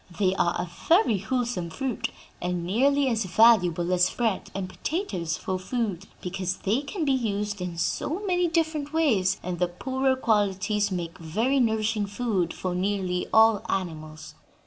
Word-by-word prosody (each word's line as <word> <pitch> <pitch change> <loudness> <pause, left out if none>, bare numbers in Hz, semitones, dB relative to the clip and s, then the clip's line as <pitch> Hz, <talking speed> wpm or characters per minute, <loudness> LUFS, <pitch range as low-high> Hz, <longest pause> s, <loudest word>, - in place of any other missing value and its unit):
They 190 -2 +3
are 170 -3 +1
a 180 - -2 0.2
very 330 - +4
wholesome 235 -4 -2
fruit 260 +6 -3 0.3
and 180 -1 -2
nearly 275 +9 +2
as 225 -4 0
valuable 180 -4 +4
as 180 0 +4
bread 225 -5 -1
and 195 -1 -3
potatoes 185 - -3
for 185 -1 -3
food, 200 -2 -3
because 185 0 -3
they 220 +7 0
can 310 +4 -3
be 275 - +2
used 210 -5 -1
in 175 -2 -4
so 305 - -1
many 360 -2 +2
different 315 -3 -1
ways, 230 - +2
and 180 -1 -4
the 180 - +2
poorer 260 +9 0
qualities 210 -3 +1
make 175 0 -4
very 220 - 0
nourishing 220 -3 +1
food 200 -5 -1
for 185 -1 -3
nearly 185 -1 -1
all 220 -2 +5
animals." 155 -4 -4
205 Hz, 155 wpm, -26 LUFS, 180-250 Hz, 0.3 s, all